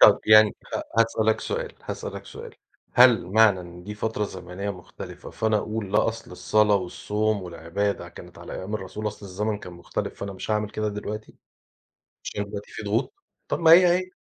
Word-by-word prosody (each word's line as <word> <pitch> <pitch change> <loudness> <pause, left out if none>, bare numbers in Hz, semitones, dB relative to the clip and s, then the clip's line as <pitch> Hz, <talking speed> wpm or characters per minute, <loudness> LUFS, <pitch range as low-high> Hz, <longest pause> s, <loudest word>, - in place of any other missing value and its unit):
طَب - - +8
يعني 110 -1 +7
خ - - -4 0.2
هاسألك 110 -1 +3
سؤال، - - -3
هاسألك - - -6
سؤال، - - -10 0.4
هل 120 -6 +6
معنى 105 -2 +5
إن 90 0 -11
دي 105 +1 -6
فترة 105 0 -1
زمنية 95 +2 -5
مختلفة، 90 -3 -9
فأنا 110 -1 +1
أقول 105 -2 -4
لا 105 - +4
أصل 115 -4 -6
الصلاة 105 +3 +3
والصوم 105 +2 -1
والعبادة 90 +4 -3
كانت - - -13
على - - -9
أيام 100 +3 -5
الرسول، 105 +1 -5
أصل 105 -1 -9
الزمن 105 +3 -2
كان 90 - -10
مختلف 85 0 -4
فأنا 100 0 -4
مش 95 - -6
هاعمل 105 -1 0
كده 110 0 -2
دلوقتي، 105 +1 -6 0.9
عشان 105 - -3
دلوقتي 100 0 -8
في 110 - -7
ضغوط؟ 105 - 0 0.4
طَب - - 0
ما 165 -1 +6
هي، 180 +1 +9
هي. 185 0 -7
105 Hz, 175 wpm, -25 LUFS, 100-110 Hz, 0.9 s, هي